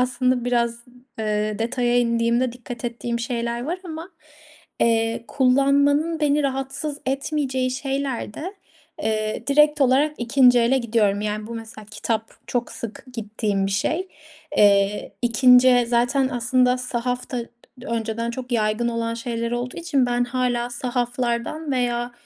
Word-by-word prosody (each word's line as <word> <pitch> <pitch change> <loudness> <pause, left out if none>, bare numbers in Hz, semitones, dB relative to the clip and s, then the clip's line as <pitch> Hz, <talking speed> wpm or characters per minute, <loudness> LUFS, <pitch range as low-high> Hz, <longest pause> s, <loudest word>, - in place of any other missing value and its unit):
aslında 250 0 +1
biraz, 235 -1 0 0.4
ııı, 210 -1 -1
detaya 240 +1 +1
indiğimde 235 +1 +1
dikkat 245 0 -9
ettiğim 235 0 -3
şeyler 235 0 -2
var 345 +5 -3
ama. 325 +2 -7 0.7
Eee, 230 0 +1
kullanmanın 280 +4 +3
beni 295 0 +2
rahatsız 270 +2 -3
etmeyeceği 270 -2 -1
şeyler 270 -4 -3
de, 370 +6 -6 0.5
eee, 215 +1 -1
direkt 300 +1 +4
olarak 275 +3 +3
2'nci 245 +1 +5
ele 240 +3 +3
gidiyorum. 215 -4 +1
Yani, 210 0 -3
bu 235 - -7
mesela 220 -1 -9
kitap 225 0 -2 0.2
çok 245 -1 -2
sık 230 +2 -7
gittiğim 210 -3 -2
bir 195 - -3
şey. 320 - -1 0.5
Eee, 200 0 +3
2'nci 250 +1 +6
zaten 245 +3 +2
aslında 250 0 +2
sahaf 250 0 -3
da 250 - -2 0.4
d 255 - -10
önceden 230 0 -2
çok 250 +1 -6
yaygın 220 +1 +1
olan 230 -1 -2
şeyler 230 0 -3
olduğu 245 +1 -3
için 290 -7 +1
ben 245 0 +1
hâlâ 245 -1 -1
sahaflardan 245 +4 -2
veya, 240 -1 -1
245 Hz, 135 wpm, -23 LUFS, 230-265 Hz, 0.7 s, 2'nci